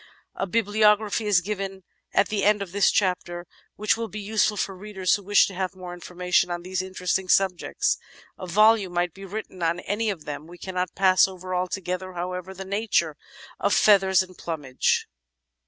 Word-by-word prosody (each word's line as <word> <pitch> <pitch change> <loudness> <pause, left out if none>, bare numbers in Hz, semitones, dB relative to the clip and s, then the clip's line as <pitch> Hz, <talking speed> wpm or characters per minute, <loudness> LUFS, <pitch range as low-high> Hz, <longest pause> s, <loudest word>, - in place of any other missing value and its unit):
A 195 - -3
bibliography 210 0 +2
is 195 -4 +4
given 195 -1 -5 0.3
at 195 - +2
the 205 -2 -1
end 210 0 +3
of 185 - -10
this 200 +1 +3
chapter 180 -3 -1 0.3
which 210 0 +1
will 230 0 -4
be 215 +1 -7
useful 210 0 +1
for 195 0 -2
readers 190 -1 -1
who 205 - +1
wish 205 +1 +4
to 195 - -7
have 185 +1 -3
more 180 -1 -8
information 180 0 0
on 175 0 -4
these 185 0 -2
interesting 185 0 -2
subjects. 185 -2 +1 0.4
A 185 - -8
volume 210 0 +4
might 175 -1 0
be 195 0 -10
written 195 -2 -7
on 170 +1 +1
any 215 +3 -2
one - - +1
of 160 -5 -15
them. 145 +1 -6
We 175 +1 -12
cannot 180 -1 -4
pass 185 0 +5
over 185 -1 -7
altogether, 185 0 -3
however, 180 +1 -5
the 190 +1 -7
nature 200 -6 0 0.4
of - - +2
feathers 190 -2 +5
and 185 0 -14
plumage. 145 -8 -1
190 Hz, 185 wpm, -25 LUFS, 180-205 Hz, 0.4 s, pass